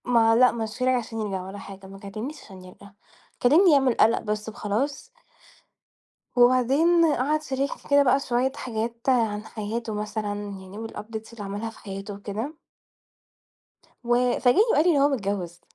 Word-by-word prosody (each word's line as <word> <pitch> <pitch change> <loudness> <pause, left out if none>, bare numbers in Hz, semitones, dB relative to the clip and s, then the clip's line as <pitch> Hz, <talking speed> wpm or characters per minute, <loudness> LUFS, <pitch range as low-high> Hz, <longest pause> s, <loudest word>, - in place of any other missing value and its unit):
ما 225 -2 +4
لأ، 250 +2 +6
مشاني 230 +3 -1
عشان 230 -2 -4
يرجع 195 -4 -3
ولا 195 +1 -8
حاجة، 195 -1 -11
ما 195 0 -11
كلمنيش 215 +9 -7
عشان 190 -2 -13
يرجع، 200 +2 -14 0.5
كلمني 325 +9 +6
يعمل 270 -3 +4
قلق 230 0 +3
بس 210 0 -3
وخلاص. 235 - -3 1.3
وبعدين 265 +8 +4
قعد 295 +5 0
شاركني 275 -1 -4
كده 285 0 +6
بقى 270 +1 +3
شوية 250 0 0
حاجات 230 -1 -4
عن 220 -5 +1
حياته 220 +1 -4
مثلًا، 210 0 -3
يعني 200 -1 -8
والupdates 220 +1 -8
اللي 220 -3 -8
عملها 205 +3 -4
في 225 - -15
حياته 195 +1 -7
وكده. 210 +8 -5 1.5
و 240 +1 +2
فاجئني 245 +10 +4
وقال 300 - +4
لي 355 - +5
إن 280 - +3
هو 285 - +4
متجوز. 195 -9 -3
225 Hz, 150 wpm, -25 LUFS, 205-255 Hz, 1.5 s, لأ